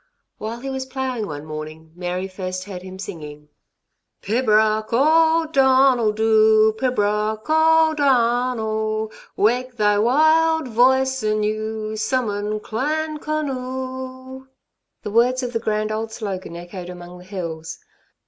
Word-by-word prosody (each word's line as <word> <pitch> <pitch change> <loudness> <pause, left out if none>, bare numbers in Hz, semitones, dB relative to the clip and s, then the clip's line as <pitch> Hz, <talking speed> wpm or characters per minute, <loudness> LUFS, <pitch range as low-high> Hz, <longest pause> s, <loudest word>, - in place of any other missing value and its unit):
While 230 +2 -5
he 270 - -5
was 265 0 -4
ploughing 260 -5 -3
one 145 -1 -7
morning, 155 +1 -8
Mary 180 +1 -3
first 185 -1 -5
heard 185 -2 -8
him 185 0 -9
singing: 150 -5 -9 0.7
Pibroch 215 -1 +2
o' 320 +6 +4
Donuil 265 -4 +4
Dhu, 220 0 +4
Pibroch 215 -3 0
o' 320 0 +4
Donuil, 230 -5 +1 0.3
Wake 245 +3 +1
thy 210 -1 +3
wild 315 +5 +3
voice 260 +3 +3
anew, 215 0 -2
Summon 215 -3 -1
Clan 305 +8 -2
Conuil. 260 -3 -5 0.6
The 210 - -5
words 250 +4 +2
of 245 0 -4
the 230 - 0
grand 215 -1 -1
old 220 +1 -3
slogan 195 -6 -5
echoed 175 +1 -8
among 180 0 -10
the - - -13
hills. 170 -5 -6
220 Hz, 120 wpm, -21 LUFS, 205-260 Hz, 0.7 s, o